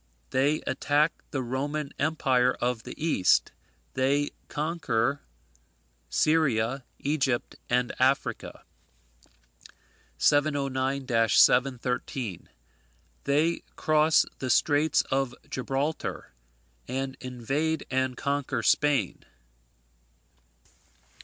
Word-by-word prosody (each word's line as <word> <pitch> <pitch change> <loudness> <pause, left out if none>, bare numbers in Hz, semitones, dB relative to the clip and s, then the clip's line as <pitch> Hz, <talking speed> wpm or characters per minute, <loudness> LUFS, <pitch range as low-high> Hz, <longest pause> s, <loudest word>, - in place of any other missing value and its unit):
They 145 +4 +2
attack 145 +4 +1 0.2
the 135 -2 -3
Roman 140 +4 -3
Empire 130 -5 +2
of 120 -2 -1
the - - -9
East. 150 - +2 0.4
They 140 +2 +1 0.2
conquer 145 -5 -1 0.9
Syria, 135 - +1
Egypt, 135 -4 -1
and 125 0 +1
Africa. 130 +2 0 1.5
709 140 - +1 0.2
713. 125 -4 +1 0.8
They 155 +4 +1
cross 155 0 +3
the 130 - -3
straits 145 +4 +3
of 135 -2 0
Gibraltar, 135 +4 -3 0.6
and 135 0 -3
invade 135 +5 -2
and 130 -1 0
conquer 140 -4 -2
Spain. 145 +4 +2
135 Hz, 75 wpm, -27 LUFS, 125-145 Hz, 1.5 s, cross